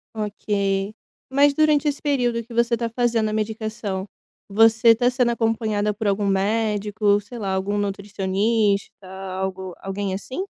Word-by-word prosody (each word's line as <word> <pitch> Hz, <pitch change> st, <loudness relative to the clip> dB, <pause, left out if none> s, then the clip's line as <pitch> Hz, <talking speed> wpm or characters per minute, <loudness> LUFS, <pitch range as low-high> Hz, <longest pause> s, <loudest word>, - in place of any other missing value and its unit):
Ok, 200 Hz, -1 st, -1 dB, 0.4 s
mas 280 Hz, +2 st, +4 dB
durante 305 Hz, 0 st, +3 dB
esse 290 Hz, -1 st, -1 dB
período 245 Hz, -5 st, 0 dB
que 235 Hz, -, -19 dB
você 235 Hz, +1 st, +2 dB
tá 235 Hz, 0 st, -2 dB
fazendo 230 Hz, -2 st, +1 dB
a -, -, -3 dB
medicação, 215 Hz, -2 st, -3 dB, 0.4 s
você 225 Hz, +2 st, +5 dB
tá 245 Hz, +2 st, +1 dB
sendo 250 Hz, -1 st, +2 dB
acompanhada 220 Hz, -3 st, 0 dB
por 210 Hz, +1 st, -3 dB
algum 200 Hz, +1 st, +1 dB
médico, 205 Hz, +1 st, +1 dB
sei 205 Hz, +4 st, -10 dB
lá, 195 Hz, -4 st, -2 dB
algum 195 Hz, +2 st, -1 dB
nutricionista 200 Hz, 0 st, -1 dB, 0.3 s
algo 190 Hz, -1 st, -4 dB
alguém, 195 Hz, 0 st, -3 dB
assim? 260 Hz, -, -5 dB
215 Hz, 140 wpm, -23 LUFS, 200-235 Hz, 0.4 s, você